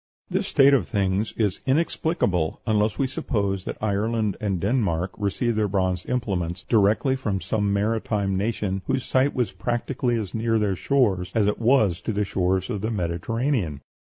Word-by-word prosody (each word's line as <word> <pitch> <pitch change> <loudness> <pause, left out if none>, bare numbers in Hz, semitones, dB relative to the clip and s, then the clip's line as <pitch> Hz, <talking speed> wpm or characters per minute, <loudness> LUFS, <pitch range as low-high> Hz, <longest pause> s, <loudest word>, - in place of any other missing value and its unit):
This - - 0
state 140 +1 +5
of 140 - +2
things 100 -1 0
is 105 -5 0
inexplicable 135 - 0
unless 105 -1 +1
we 135 - +1
suppose 100 -7 -2
that - - -5
Ireland 110 0 0
and 100 -4 -1
Denmark 95 -4 0
received 105 +3 -1
their 105 - +2
bronze 95 -2 -1
implements 90 -8 -2
directly 110 +6 +3
from 105 -7 -2
some 105 0 -1
maritime 105 -1 0
nation 100 -1 -1
whose 130 -2 0
site 130 +2 +2
was 125 -4 0
practically 120 +1 -1
as 100 -4 -5
near 115 0 +1
their 105 -3 +1
shores 95 -4 +1
as 110 -2 +3
it 105 - 0
was 110 -8 +3
to 115 - -3
the 105 0 0
shores 95 +2 0
of 105 -4 -3
the 110 - -1
Mediterranean. 95 - -1
105 Hz, 165 wpm, -24 LUFS, 95-120 Hz, -, state